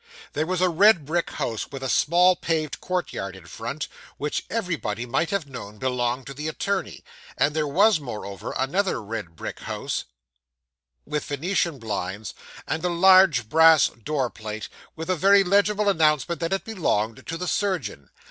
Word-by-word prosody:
There 155 +2 -1
was 185 0 -1
a 185 - +5
red 175 -2 +5
brick 170 +4 -1
house 115 -2 -3
with 135 -1 -7
a - - -1
small 175 +7 +4
paved 160 -3 -2
courtyard 175 - -3
in 95 -3 -13
front, 115 - -5 0.3
which 150 +1 -3
anybody 160 - -2
might 135 +7 0
have 200 -5 -1
known 115 -6 -9
belonged 125 0 -1
to 135 - -7
the 150 +3 -5
attorney; 190 +4 -3 0.3
and 150 +1 +2
there 155 -1 +1
was, 195 +6 +4
moreover, 105 - -6
another 180 +9 0
red 105 -6 -6
brick - - -6
house - - -4 1.0
with 150 0 -3
Venetian 165 +2 -1
blinds, 100 -3 -4 0.3
and 160 +1 -2
a 180 - +1
large 180 - +5
brass 160 +3 +6
door 130 +1 -3
plate 110 -1 -7 0.3
with 160 0 -6
a 185 - +1
very 195 +4 +5
legible 205 +2 +2
announcement 160 -2 +2
that 165 - -1
it 195 - -1
belonged 115 - -1
to 165 - -3
the 180 +1 -4
surgeon. 180 - -2
155 Hz, 165 wpm, -24 LUFS, 120-180 Hz, 1.0 s, brass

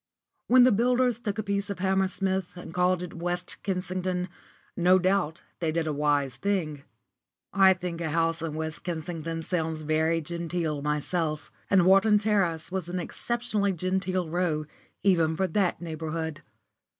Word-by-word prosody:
*_ - - -64 0.4
When 255 0 +7
the 255 - +6
builders 245 +2 +2
took 210 -3 -3
a 215 - -1
piece 200 0 -2
of 200 - -3
Hammersmith 190 -1 0
and 175 -2 -9
called 180 0 +2
it 180 - -7
West 175 +1 -3
Kensington, 185 -1 -2 0.5
no 180 +1 +5
doubt 185 -3 0 0.2
they 165 -2 0
did 165 0 0
a 155 - -1
wise 145 -3 +1
thing. 165 -6 -1 0.7
I 190 -1 +7
think 180 -2 -5
a 160 - -1
house 165 +1 +1
in 160 -2 -3
West 160 0 -4
Kensington 165 -1 -4
sounds 160 -3 -2
very 160 +2 +2
genteel 165 -2 -3
myself, 150 +1 -1 0.2
and 190 -3 +5
Wharton 195 +3 +6
Terrace 195 -7 0
was 185 -3 -3
an 180 +1 -2
exceptionally 210 +1 -1
genteel 185 0 -1
row 160 -2 0 0.4
even 165 -5 +3
for 190 - +2
that 190 -1 0
neighbourhood. 160 -1 -4
175 Hz, 155 wpm, -27 LUFS, 160-190 Hz, 0.7 s, When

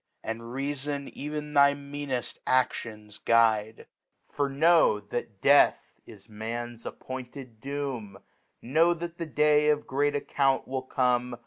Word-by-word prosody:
And 115 +1 -4
Reafon 140 +1 -4
ev'n 150 +1 -5
thy 140 -1 +5
meaneft 140 -3 -5
Adions 110 -4 -1
guide: 110 -1 +2 0.4
For 140 -1 -2
know 155 -5 +4
that 105 -1 -6
Death 145 0 +4
is 100 -3 -14
Man's 115 +2 -6
appointed 130 -2 -8
Doom, 135 -8 -5 0.5
Know 165 +7 +3
^at 170 0 -7
t)ie 165 - -3
Dsw^of 150 0 +3
great 145 +2 0
Account 135 -1 0
will 130 0 -2
come 125 -2 0
135 Hz, 120 wpm, -28 LUFS, 115-145 Hz, 0.5 s, thy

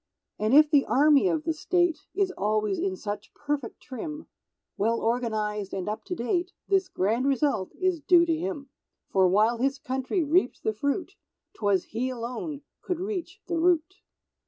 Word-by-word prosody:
And 215 +5 +2
if 305 +1 +8
the 285 -3 +5
Army 295 +5 +5
of 325 -4 0
the 325 - 0
State 350 +2 0
Is 390 -1 +1
always 215 - 0
in 190 -1 -1
such 205 +1 -6
perfect 290 -5 -4
trim, 300 +4 -6 0.5
Well 230 +3 +1
organized 215 -4 -1
and 190 0 -4
up 215 +1 -4
to 360 - -3
date, 355 +7 -1
This 385 -1 +2
grand 225 +8 0
result 275 -8 0
is 370 -3 +1
due 345 +2 +5
to 330 -1 +1
him; 320 -5 -4 0.4
For 190 -1 +4
while 215 +6 +3
his 270 +2 +1
country 265 +6 -1
reaped 305 -2 +1
the 220 - 0
fruit, 315 - -2 0.4
'Twas 200 -4 +1
he 245 +4 -3
alone 255 +5 -5 0.2
could 360 -2 -3
reach 380 -2 -4
the 345 -2 -1
Root. 350 +2 +2
275 Hz, 165 wpm, -27 LUFS, 220-340 Hz, 0.5 s, if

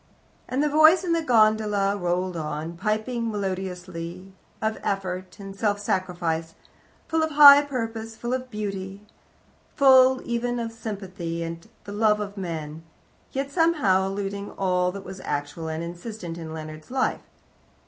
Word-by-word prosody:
And 265 +3 0
the - - +3
voice 315 +5 +6
in 345 -2 0
the 335 - +1
gondola 215 -6 +3
rolled 180 -1 -1
on, 155 +1 -4
piping 220 +5 -1
melodiously 185 -2 -5 0.3
of 220 0 -1
Effort 185 -1 -3
and 195 -1 -8
Self 205 0 0
Sacrifice, 175 -4 -2 0.5
full 325 0 +1
of 315 - +1
high 285 -1 +10
purpose, 225 -5 -5
full 240 +2 -3
of 255 0 -3
beauty, 200 -2 -5 0.7
full 260 -2 +6
even 240 +1 -1
of 230 -1 -3
sympathy 190 -7 -5
and 165 0 -7
the 205 - -9
love 210 0 +2
of 205 -1 -5
men, 160 -5 -5 0.5
yet 275 +1 -3
somehow 280 - +3
eluding 200 +1 -4
all 180 -1 +1
that 195 +1 -8
was 190 - -8
actual 145 +3 -3
and 160 +1 -3
insistent 175 +1 -7
in 160 -1 -7
Leonard's 155 -1 -8
life. 260 0 0
200 Hz, 145 wpm, -25 LUFS, 180-235 Hz, 0.7 s, high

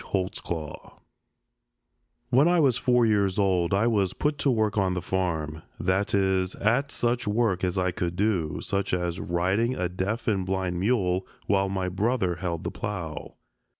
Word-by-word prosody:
HOLTZCLAW 85 -5 -4 1.3
When 135 +5 +5
I 175 0 +4
was 135 -6 +4
four 125 -2 +3
years 100 -4 +2
old 95 -4 +2
I 100 +3 +2
was 100 -5 +1
put 150 -1 -1
to 140 - +2
work 110 -4 +1
on 95 -3 +1
the - - 0
farm, 80 -5 -2 0.2
that 95 +3 +1
is, 95 -1 +1
at 125 +7 +1
such 120 -1 0
work 105 -4 +1
as 90 -1 0
I 90 -1 +1
could 90 -3 -3
do, 95 -6 0
such 100 -1 -1
as 90 -1 -2
riding 95 +8 0
a 90 - -1
deaf 95 +7 -3
and 100 -4 +1
blind 95 -1 -2
mule 95 -3 +1 0.2
while 100 -1 +2
my 95 -1 -2
brother 95 -1 0
held 85 -3 -3
the - - -3
plow. 85 -8 -5
95 Hz, 165 wpm, -26 LUFS, 90-110 Hz, 1.3 s, When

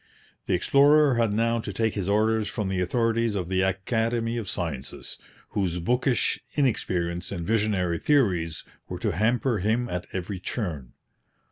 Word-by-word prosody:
The - - +2
explorer 145 - +5
had 115 -3 +2
now 115 +2 +1
to - - -5
take 110 -1 0
his 100 -2 -2
orders 110 +1 +2
from 105 -2 -3
the 95 -1 -1
authorities 115 +3 +1
of 90 -3 -3
the 95 0 +1
Academy 115 +5 0
of 110 -5 -4
Sciences, 70 -6 -5 0.3
whose 90 -4 -1
bookish 125 +8 +1 0.2
inexperience 90 - -1
and 85 -4 -4
visionary 100 -5 +1
theories 90 - +1 0.3
were - - -4
to - - -1
hamper 115 - +1
him 110 +6 0
at 90 0 -4
every 95 +1 -4
turn. 80 - -4
105 Hz, 150 wpm, -26 LUFS, 90-115 Hz, 0.3 s, explorer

